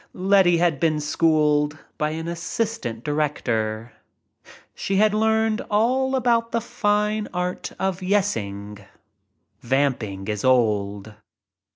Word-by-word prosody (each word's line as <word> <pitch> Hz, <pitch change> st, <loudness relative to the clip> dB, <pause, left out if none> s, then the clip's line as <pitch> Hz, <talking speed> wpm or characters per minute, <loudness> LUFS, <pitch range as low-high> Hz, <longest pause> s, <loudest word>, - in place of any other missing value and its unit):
Letty 185 Hz, -2 st, +4 dB
had 165 Hz, -4 st, +1 dB
been 155 Hz, -1 st, +1 dB
schooled 150 Hz, -1 st, +2 dB
— -, -, -40 dB
by 150 Hz, -, +1 dB
an 160 Hz, +1 st, -5 dB
assistant 170 Hz, -, -3 dB
director. 120 Hz, -7 st, -2 dB, 0.8 s
She 195 Hz, -, -3 dB
had 210 Hz, +1 st, +4 dB
learned 220 Hz, 0 st, +1 dB
all 255 Hz, +5 st, +2 dB
about 235 Hz, -2 st, +1 dB
the 230 Hz, -, +1 dB
fine 210 Hz, -1 st, 0 dB
art 180 Hz, 0 st, -3 dB
of 190 Hz, -1 st, -1 dB
"yessing." 105 Hz, -, -2 dB, 0.8 s
Vamping 120 Hz, -7 st, -1 dB
is 105 Hz, -1 st, -3 dB
old. 105 Hz, -5 st, +1 dB
165 Hz, 110 wpm, -23 LUFS, -, 0.8 s, Letty